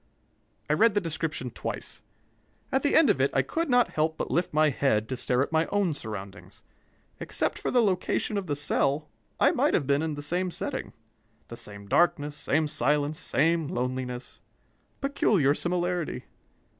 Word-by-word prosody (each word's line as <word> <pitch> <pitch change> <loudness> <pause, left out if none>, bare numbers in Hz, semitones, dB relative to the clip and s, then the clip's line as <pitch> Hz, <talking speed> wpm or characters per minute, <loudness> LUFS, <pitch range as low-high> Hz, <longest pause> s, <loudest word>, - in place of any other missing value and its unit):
I 150 - +2
read 220 +5 +4
the - - +4
description 160 -7 -3
twice. - - -6 0.7
At 265 - +2
the 285 - +1
end 295 -9 +6
of 130 - -1
it 140 - +3
I 135 - +4
could 330 - -2
not 245 -1 +4
help 160 +1 0
but - - -3
lift 175 +2 0
my 155 0 +3
head 110 -6 +1
to 130 - -2
stare 125 +1 +1
at - - -6
my 160 0 +2
own 200 -5 +1
surroundings. 105 -7 -8 0.6
Except - - -1
for - - -2
the 245 -2 +3
location 200 +1 0
of 200 -2 -2
the 145 - -1
cell, 145 +1 0 0.3
I - - +5
might - - +2
have - - +1
been 140 +2 +2
in 160 -2 -2
they 145 - -6
same 180 +5 -1
setting. 265 - -4 0.6
The 115 - -8
same 100 -3 -7
darkness, 145 +4 +2
same 150 +1 +1
silence, 150 +2 +1
same 165 -1 +1
loneliness. 125 -1 -4 0.6
Peculiar 205 - +2
similarity! 175 0 -2
155 Hz, 170 wpm, -27 LUFS, 135-180 Hz, 0.7 s, end